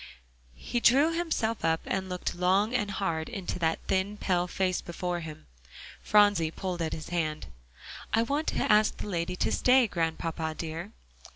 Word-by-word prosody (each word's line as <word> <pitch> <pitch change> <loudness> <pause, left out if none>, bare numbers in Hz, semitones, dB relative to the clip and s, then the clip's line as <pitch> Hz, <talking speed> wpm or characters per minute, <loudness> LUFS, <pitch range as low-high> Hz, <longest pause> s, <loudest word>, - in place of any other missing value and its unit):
He 240 - -3
drew 280 +8 +5
himself 315 -10 -1
up 160 0 +2
and 190 -1 -2
looked 180 0 -3
long 190 +5 +2
and 210 -5 0
hard 165 -5 -2
into 195 -5 -4
the 160 -1 +1
thin 195 +2 0
pale 180 -3 0
face 185 0 -1
before 175 0 -3
him. 155 - -9 0.6
Phronsie 205 -6 +4
pulled 180 +1 -4
at 160 - -1
his 155 - -7
hand. 155 -3 -2 0.7
"I 225 - +3
want 285 +6 -1
to - - +1
ask 210 0 +4
the - - -6
lady 180 -2 -2
to - - 0
stay, 255 0 +4
Grandpapa 165 -3 -2
dear." 165 +4 -5
185 Hz, 165 wpm, -28 LUFS, 165-210 Hz, 0.7 s, drew